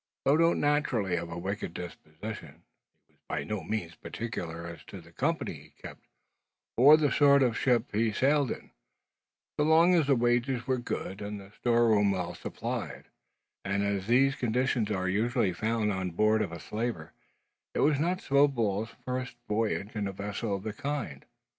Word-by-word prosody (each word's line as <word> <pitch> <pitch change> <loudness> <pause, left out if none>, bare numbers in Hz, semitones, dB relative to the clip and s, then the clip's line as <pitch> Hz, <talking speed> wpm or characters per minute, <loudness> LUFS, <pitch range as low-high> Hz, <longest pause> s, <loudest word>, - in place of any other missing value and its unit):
Though 140 - +5
not 165 +1 +3
naturally 135 -10 +1
of 85 -1 -3
a 85 - -6
wicked 95 -1 -4
disposition, 85 -1 -8 0.4
he - - -35
was - - -37
by - - -2
no 105 -2 -3
means 90 -4 -3
particular 85 -9 -6
as 85 -1 -9
to 100 - -9
the 85 0 -16
company - - -1
he - - -13
kept, - - -10 0.7
or 145 +6 +8
the 150 -3 +1
sort 140 -2 +5
of 120 -3 +1
ship 120 -2 +1
he 110 +1 +2
sailed 140 +4 +2
in, - - -6 0.9
so - - +4
long 165 +3 +5
as 165 -5 +3
the 140 - +4
wages 120 +1 +1
were 130 -1 0
good 100 -4 -5
and 105 0 -5
the 100 0 -13
store 120 +1 +2
room 105 -2 +4
well 90 -3 -2
supplied; - - -5 0.5
and 100 +1 0
as 100 -1 -1
these 135 +3 +4
conditions 125 -2 0
are 95 -3 -1
usually 110 +1 +1
found 110 +3 0
on 95 -2 -2
board 110 +5 +2
of 90 - -2
a 85 - -7
slaver, 105 -6 -4 0.6
it - - +1
was 145 -1 +3
not 180 +4 0
Snowball's 115 -7 +2 0.2
first 125 -1 -3
voyage 105 0 -1
in 105 -1 -1
a - - -3
vessel 100 +2 -3
of 95 - -6
the 110 -1 -4
kind. 145 0 -4
110 Hz, 180 wpm, -29 LUFS, 100-130 Hz, 0.9 s, or